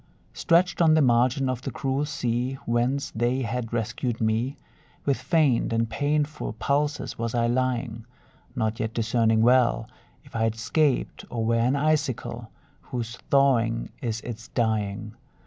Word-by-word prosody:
Stretched 180 Hz, +1 st, +2 dB
on 160 Hz, -2 st, +6 dB
the 160 Hz, -, +4 dB
margin 125 Hz, +2 st, +3 dB
of 130 Hz, -2 st, -2 dB
the -, -, -4 dB
cruel 135 Hz, +1 st, -1 dB
sea 125 Hz, -3 st, -1 dB
Whence 125 Hz, +4 st, 0 dB
they 120 Hz, +3 st, 0 dB
had 115 Hz, 0 st, -3 dB
rescued 120 Hz, +1 st, -2 dB
me, 115 Hz, +5 st, 0 dB, 0.5 s
With 140 Hz, -2 st, +1 dB
faint 150 Hz, -10 st, +2 dB
and 115 Hz, 0 st, +1 dB
painful 150 Hz, +5 st, -1 dB
pulses 145 Hz, -1 st, -1 dB
was 115 Hz, 0 st, -2 dB
I 115 Hz, -1 st, +2 dB
lying; 120 Hz, -2 st, -1 dB, 0.5 s
Not 110 Hz, -2 st, -1 dB
yet 110 Hz, +1 st, -3 dB
discerning 115 Hz, -1 st, +2 dB
well 120 Hz, -2 st, +3 dB, 0.4 s
If -, -, -16 dB
I 115 Hz, -, 0 dB
had 115 Hz, 0 st, +1 dB
'scaped, 130 Hz, +5 st, 0 dB
or 115 Hz, -2 st, -2 dB
were 115 Hz, -, +2 dB
an 125 Hz, +4 st, +2 dB
icicle, 140 Hz, -6 st, -1 dB, 0.3 s
Whose 120 Hz, -2 st, -5 dB
thawing 120 Hz, -5 st, +3 dB
is 115 Hz, -1 st, -2 dB
its 120 Hz, 0 st, -7 dB
dying. 110 Hz, -2 st, -1 dB
120 Hz, 145 wpm, -26 LUFS, 115-135 Hz, 0.5 s, on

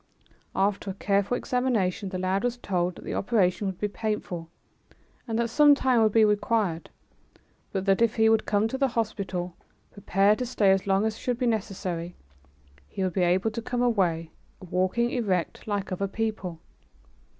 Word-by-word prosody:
After 200 Hz, +1 st, 0 dB
a 190 Hz, -, -4 dB
careful 200 Hz, +4 st, +1 dB
examination 225 Hz, -8 st, 0 dB
the 185 Hz, -, -4 dB
lad 185 Hz, +3 st, 0 dB
was 245 Hz, 0 st, -1 dB
told 180 Hz, -6 st, -1 dB
that -, -, -12 dB
the -, -, -4 dB
operation 200 Hz, -3 st, +1 dB
would 190 Hz, -2 st, -4 dB
be 210 Hz, -, 0 dB
painful, 200 Hz, -6 st, -4 dB, 0.8 s
and 225 Hz, -1 st, -1 dB
that 235 Hz, -1 st, 0 dB
some 295 Hz, +2 st, +6 dB
time 255 Hz, -4 st, +2 dB
would 215 Hz, -1 st, +4 dB
be 220 Hz, +1 st, +5 dB
required, 210 Hz, -5 st, 0 dB, 0.8 s
but 190 Hz, -1 st, -2 dB
that 195 Hz, +2 st, +3 dB
if 230 Hz, 0 st, +3 dB
he 220 Hz, -1 st, +4 dB
would 220 Hz, -1 st, +3 dB
come 210 Hz, +1 st, +2 dB
to 265 Hz, -, -4 dB
the 275 Hz, -, +3 dB
hospital, 200 Hz, -7 st, -3 dB, 0.4 s
prepared 200 Hz, +1 st, +2 dB
to 250 Hz, -, -1 dB
stay 205 Hz, -5 st, +3 dB
as 195 Hz, +1 st, +1 dB
long 195 Hz, +2 st, +2 dB
as 220 Hz, 0 st, -2 dB
should 245 Hz, -2 st, -1 dB
be 250 Hz, -, -1 dB
necessary, 185 Hz, -6 st, -2 dB, 0.7 s
he 190 Hz, -, -4 dB
would 185 Hz, -2 st, -1 dB
be 190 Hz, -, 0 dB
able 185 Hz, +5 st, +2 dB
to 230 Hz, -, -4 dB
come 245 Hz, +1 st, -2 dB
away, 175 Hz, -9 st, +1 dB, 0.4 s
walking 185 Hz, +7 st, +1 dB
erect, 195 Hz, -9 st, -2 dB
like 200 Hz, -2 st, -2 dB
other 195 Hz, +2 st, -1 dB
people. 195 Hz, -5 st, -3 dB
205 Hz, 175 wpm, -26 LUFS, 185-225 Hz, 0.8 s, some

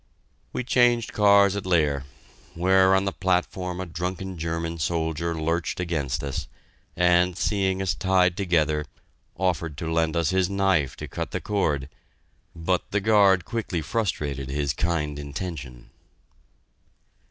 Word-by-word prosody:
We -, -, -3 dB
changed 120 Hz, -2 st, +2 dB
cars 100 Hz, -1 st, +5 dB
at 100 Hz, -, -3 dB
Leer, 75 Hz, -6 st, +2 dB, 0.5 s
where 95 Hz, +2 st, +4 dB
on 95 Hz, +1 st, +2 dB
the 95 Hz, -, 0 dB
platform 90 Hz, -1 st, -1 dB
a 95 Hz, -, -3 dB
drunken 90 Hz, +3 st, -4 dB
German 85 Hz, 0 st, -3 dB
soldier 80 Hz, +1 st, -1 dB
lurched 80 Hz, +2 st, -1 dB
against 75 Hz, -6 st, -2 dB
us, 70 Hz, -1 st, -4 dB, 0.5 s
and, 90 Hz, 0 st, +3 dB
seeing 95 Hz, -1 st, 0 dB
us 95 Hz, -, 0 dB
tied 90 Hz, -2 st, +2 dB
together, 80 Hz, -6 st, +1 dB, 0.5 s
offered 85 Hz, -4 st, -1 dB
to 80 Hz, -1 st, -3 dB
lend 80 Hz, 0 st, +1 dB
us 85 Hz, -1 st, +1 dB
his 95 Hz, -1 st, +2 dB
knife 95 Hz, -8 st, +1 dB
to -, -, -7 dB
cut -, -, -4 dB
the -, -, -3 dB
cord, 75 Hz, -10 st, -1 dB, 0.7 s
but 85 Hz, +2 st, -1 dB
the 105 Hz, -, +1 dB
guard 100 Hz, -3 st, +4 dB
quickly 105 Hz, -8 st, -3 dB
frustrated 75 Hz, -, -2 dB
his 70 Hz, 0 st, -1 dB
kind 75 Hz, -3 st, -1 dB
intention. 70 Hz, -4 st, -7 dB
90 Hz, 135 wpm, -25 LUFS, 80-95 Hz, 0.7 s, cars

